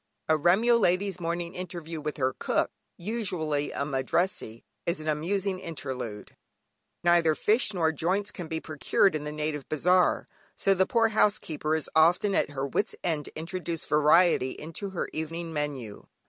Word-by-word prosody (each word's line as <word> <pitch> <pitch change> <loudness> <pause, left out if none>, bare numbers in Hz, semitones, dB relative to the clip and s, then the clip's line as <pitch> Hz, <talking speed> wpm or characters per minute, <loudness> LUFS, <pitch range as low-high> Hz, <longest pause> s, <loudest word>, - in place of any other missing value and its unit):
A 160 - +4
Remyo 195 +10 +4
lady's 185 -1 +1
morning 170 +1 -3
interview 170 -3 -6
with 150 0 -4
her 130 -2 +1
cook, - - 0 0.3
usually 170 -8 -2
a 140 - -2
Madrassee, 135 - -1 0.2
is 170 0 0
an 155 - -7
amusing 185 +5 -1
interlude. 130 - -6 0.7
Neither 170 -2 +4
fish 215 +6 +2
nor 165 -5 +1
joints 185 +6 -1
can 175 -4 -7
be 160 0 -3
procured 160 +4 +1
in 150 -1 -3
the 150 - -3
native 150 -2 -4
bazaar, 180 +4 +2 0.3
so 195 - +2
the 190 0 +2
poor 230 -1 +3
housekeeper 165 -8 +1
is 160 - -1
often 175 +5 +4
at - - +2
her 140 -1 -3
wits' 140 +8 -1
end 155 -4 -1
to - - -10
introduce 170 0 -3
variety 150 -2 +4
into 165 +6 -6
her 190 - -3
evening 165 +1 -4
menu. 140 -8 -4
165 Hz, 160 wpm, -28 LUFS, 150-185 Hz, 0.7 s, A